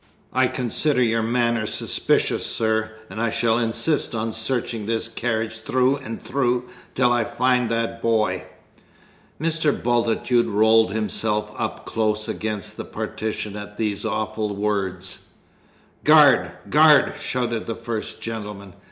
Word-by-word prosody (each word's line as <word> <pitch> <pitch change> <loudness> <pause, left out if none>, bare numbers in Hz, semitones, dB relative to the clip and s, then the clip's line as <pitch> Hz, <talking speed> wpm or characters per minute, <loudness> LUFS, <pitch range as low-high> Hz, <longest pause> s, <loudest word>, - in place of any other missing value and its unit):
I - - +4
consider 125 +2 +1
your 115 -1 +1
manner 115 -1 +1
suspicious, - - 0
sir; 110 0 0 0.2
and 110 - -6
I 115 - +1
shall 115 +1 +1
insist 120 +4 0
on 110 0 -2
searching 110 -1 -2
this 115 0 -1
carriage 110 -1 -2
through 130 +4 +1
and 120 -5 -8
through 125 -2 0 0.3
till 125 -2 +3
I 120 -1 +2
find 125 0 +1
that 115 0 -2
boy!" 110 -2 +1 0.9
Mr. 160 -1 +1
Bultitude 120 -1 +1
rolled 110 0 +4
himself 105 0 -1
up - - -4
close 110 -1 -1
against 105 -3 -4
the - - -4
partition 105 -1 -4
at 105 0 -8
these 105 -3 -1
awful 110 -1 -2
words. 95 -3 -2 0.8
"Guard, 140 - +6 0.2
guard!" 150 -1 +6
shouted 120 -3 -2
the 115 - -2
first 115 -1 -5
gentleman. 105 -4 -6
115 Hz, 130 wpm, -23 LUFS, 110-120 Hz, 0.9 s, Guard